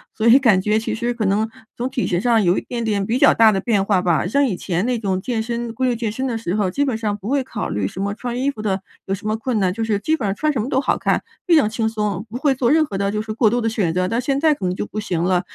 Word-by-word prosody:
所 220 +1 0
以 240 +4 +8
感 220 -9 +4
觉 210 +2 +1
其 220 - -2
实 240 +2 -1
可 235 -3 -2
能 210 +3 +1 0.3
从 250 +2 -3
体 260 -2 -2
型 175 +1 0
上 230 -3 +3
有 175 +1 +3
一 - - -9
点 235 -1 -5
点 205 -3 0
比 230 +5 0
较 - - +6
大 225 -1 +6
的 195 - 0
变 205 -2 +1
化 195 -3 +1
吧。 175 -1 +1
像 280 +7 +2
以 205 -8 -1
前 180 +3 -2
那 245 -2 0
种 190 -3 -1
健 225 +3 -2
身 235 0 -4
规 255 +2 0
律 245 - +1
健 225 -2 -2
身 260 +4 -3
的 230 -2 -2
时 190 -5 -3
候， 205 -3 +1
基 285 +9 0
本 255 -5 -1
上 210 -2 -2
不 200 +1 -9
会 275 0 +1
考 225 -4 -5
虑 100 -2 -1
什 185 - -8
么 200 +1 -1
穿 245 +3 -4
衣 280 +2 +1
服 215 - -9
的 195 -2 -1 0.2
有 195 - 0
什 200 - -13
么 215 - +1
困 230 -1 -2
难， 185 -2 +1
就 225 +2 -3
是 220 -2 0
基 310 +11 0
本 225 -10 -3
上 195 - -1
穿 305 -1 0
什 230 - -1
么 245 - -4
都 265 - +2
好 - - +1
看， - - 0 0.2
非 340 - +5
常 245 - +4
轻 220 0 -1
松， 210 -3 -2
不 240 - -5
会 280 0 +2
做 250 -2 +1
任 310 +2 +4
何 200 - -7
的 200 0 0
就 210 - -2
是 215 0 -4
过 220 -1 +3
度 245 +2 0
的 225 - -1
选 210 -7 0
择。 165 - -7
但 230 - 0
现 270 +2 0
在 315 -1 +4
可 205 -10 -5
能 180 - -1
就 205 - -3
不 215 - -6
行 175 -5 -2
了， 180 -1 +2
220 Hz, 355 characters per minute, -20 LUFS, 200-245 Hz, 0.3 s, 以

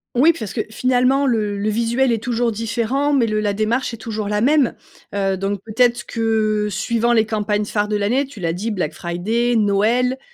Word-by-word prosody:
Oui 290 +7 +6
parce 220 - -6
que - - -1
finalement 255 +4 +2
le 215 -5 0
le 205 +2 -1
visuel 235 +4 +1
est 225 -2 -1
toujours 240 0 0
différent, 235 +6 -1
mais 265 -4 +3
le 215 -1 -1
la 205 -1 0
démarche 230 +4 -1
est - - -13
toujours 215 -2 -4
la 210 0 0
même, 280 +1 +3 0.4
heu, 195 -1 0
donc 195 +1 -2
peut-être 240 +2 +1
que 220 -2 0
suivant 230 +4 0
les 220 -2 +3
campagnes 210 -1 -1
phares 205 0 -1
de 210 - -1
l'année 225 +7 +1
tu 265 -6 -12
l'as 165 -2 -1
dit, 200 +6 -3
Black 175 -8 -2
Friday, 215 +9 -1
Noël, 225 +5 +2
225 Hz, 195 wpm, -20 LUFS, 210-245 Hz, 0.4 s, Oui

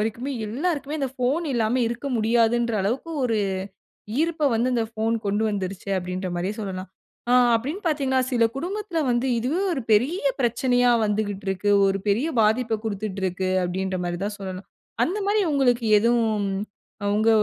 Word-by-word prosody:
வரைக்குமே, 230 +6 -2
எல்லாருக்குமே 295 +4 -2
அந்த 270 - 0
போன் 295 +7 +1
இல்லாம 235 +1 +1
இருக்க 240 +4 -4
முடியாதுன்ற 235 +1 +2
அளவுக்கு 245 +11 -2
ஒரு 230 -3 +1 0.9
ஈர்ப்ப 320 -3 +1
வந்து 245 +3 +1
இந்த 235 -2 +1
ஃபோன் 225 +1 0
கொண்டு 205 +2 +1
வந்துருச்சு 195 -1 -4
அப்பிடின்றமாரியே 180 +1 -3
சொல்லலாம். 190 -3 -5 0.4
ஆ - - +5 0.2
அப்பிடின்னு 290 - -3
பார்த்தீங்கன்னா, 270 -4 +1
சில 240 -2 +3
குடும்பத்தில 360 +1 -2
வந்து 240 +2 +1
இதுவே 275 +11 -1
ஒரு 265 -7 -3
பெரிய 255 - +3 0.2
பிரச்சனையா 245 +1 +3
வந்துக்கிட்டுருக்கு. 205 -1 -1 0.2
ஒரு 195 0 0
பெரிய 230 +10 +2
பாதிப்ப 220 +1 +2
குடுத்துட்டுருக்கு 190 -3 -2
அப்பிடின்றமாரி 180 -1 -2
தான் 205 0 -3
சொல்லனும். 190 -1 -6 0.4
அந்தமாரி 410 +3 0
உங்களுக்கு 245 -4 +2
எதுவும் 230 -1 +2 0.8
உங்க 215 +2 +3
230 Hz, 135 wpm, -24 LUFS, 200-265 Hz, 0.9 s, ஆ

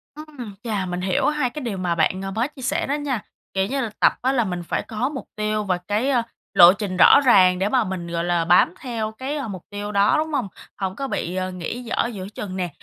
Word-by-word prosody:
Ừm, 290 -9 -9
chà, 210 -5 -2
mình 180 0 -4
hiểu 185 0 +1
hai 300 -4 +1
cái 300 +4 -7
điều 230 -7 -3
mà 180 -2 -1
bạn, 170 +3 +1
ờ, 195 0 -4
mới 230 +5 0
chia 295 -2 -14
sẻ 260 - 0
đó 280 - 0
nha, 280 -6 -2 0.3
kiểu 190 0 +1
như 275 +3 -1
là, 235 - -2
tập - - +5
á 260 - +2
là 255 -3 +2
mình 180 -3 -4
phải - - -2
có 230 +4 -1
mục 280 -3 -6
tiêu 215 0 -1
và 185 -3 0
cái, 215 +6 0
a, 245 -4 +2 0.3
lộ 175 +1 +9
trình 195 -2 -4
rõ 185 - +8
ràng 185 -7 +6
để 195 +2 +1
mà 255 +1 +3
mình, 185 -2 -5
gọi 170 0 -2
là, 175 -1 +1
bám 175 0 +5
theo 225 -4 -3
cái, 260 +6 -5
a, 275 - -4
mục 190 -4 -6
tiêu 205 0 -5
đó, 200 0 +3
đúng 315 0 -2
hông? 260 -7 0 0.3
Hổng 190 -1 -3
có 275 +3 -3
bị, 180 -8 -3
ờ, 185 0 -2
nghỉ 185 +7 -5
dở 235 0 0
giữa 190 -2 -6
chừng 190 -3 -5
nè. 180 -2 -2
210 Hz, 260 wpm, -22 LUFS, 185-255 Hz, 0.3 s, lộ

